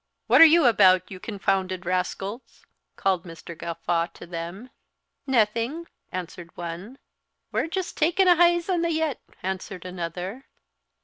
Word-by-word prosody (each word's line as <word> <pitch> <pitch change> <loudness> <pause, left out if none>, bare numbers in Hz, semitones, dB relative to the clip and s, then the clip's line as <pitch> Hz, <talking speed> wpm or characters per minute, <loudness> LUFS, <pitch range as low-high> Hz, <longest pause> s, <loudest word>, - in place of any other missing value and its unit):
"What - - +6
are - - +13
you 325 -1 +6
about, 185 -6 +5
you 185 - -8
confounded 190 -3 -2
rascals?" 190 +5 -4 0.3
called 190 -3 0
Mr. 170 -1 -10
Gawffaw 170 +1 -2
to - - -10
them. 175 +8 -7 0.6
"Naething," 235 +6 +1 0.3
answered 175 -1 -6
one. 175 +9 -7 0.5
"We're - - 0
just 370 +2 -4
takin' 350 +5 +3
a 355 - +7
heize 345 0 +3
on 360 -3 +1
the 335 0 0
yett," 315 -4 -1 0.2
answered 190 -1 -5
another. 180 - -6
195 Hz, 135 wpm, -25 LUFS, -, 0.6 s, are